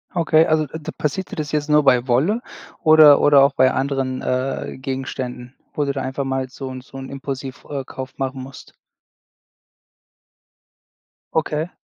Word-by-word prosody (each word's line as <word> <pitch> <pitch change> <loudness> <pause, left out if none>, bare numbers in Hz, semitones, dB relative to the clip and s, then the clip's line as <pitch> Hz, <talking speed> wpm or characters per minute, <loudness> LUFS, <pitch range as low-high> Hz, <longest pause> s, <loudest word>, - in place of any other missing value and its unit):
Okay, 160 -2 +4
also 155 -1 +2
d 155 +2 -7
passiert 185 +6 -3
dir - - -5
das 155 -4 -4
jetzt 150 0 -1
nur 150 0 +5
bei 125 -2 +3
Wolle 155 - +2 0.4
oder 155 -3 +7
oder 145 -1 +6
auch 140 0 +3
bei 130 -1 +4
anderen, 135 -1 -2
äh, 130 +1 -2
Gegenständen, 130 -2 -5 0.2
wo 145 - 0
du 140 - 0
da 135 - -3
einfach 130 +1 -3
mal 135 -1 -2
so 135 0 -7
'n 130 - -7
so 135 +1 -13
'n 135 0 -7
Impulsiv 135 -1 -6
äh, 140 -2 -3
Kauf 130 0 -8
machen 135 0 -3
musst. 130 +1 -12 2.6
Okay. 155 +1 -1
135 Hz, 160 wpm, -21 LUFS, 130-150 Hz, 2.6 s, oder